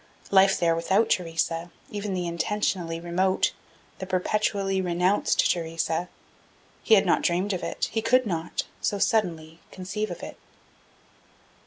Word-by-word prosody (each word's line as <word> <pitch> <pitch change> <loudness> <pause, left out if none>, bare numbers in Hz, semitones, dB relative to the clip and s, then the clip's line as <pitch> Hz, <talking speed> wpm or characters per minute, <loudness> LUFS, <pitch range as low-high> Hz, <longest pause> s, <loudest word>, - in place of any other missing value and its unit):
Life 195 0 +5
there 165 -1 +3
without 190 +7 +1
Theresa, 165 -1 -1 0.2
even 205 -2 -3
the 180 -1 -2
intentionally 170 -1 -1
remote, 180 +3 +1 0.5
the 190 - -5
perpetually 195 +1 0
renounced 180 +2 +2
Theresa 165 0 -2 0.7
he 225 - +5
had 200 0 +4
not 175 - +3
dreamed 185 +4 0
of 180 - -3
it, - - -2
he 225 - -1
could 255 +3 +3
not, 170 -4 -2 0.2
so 205 - 0
suddenly, 170 -6 0
conceive 205 +3 -4
of - - -7
it. - - -8
185 Hz, 135 wpm, -26 LUFS, 170-200 Hz, 0.7 s, Life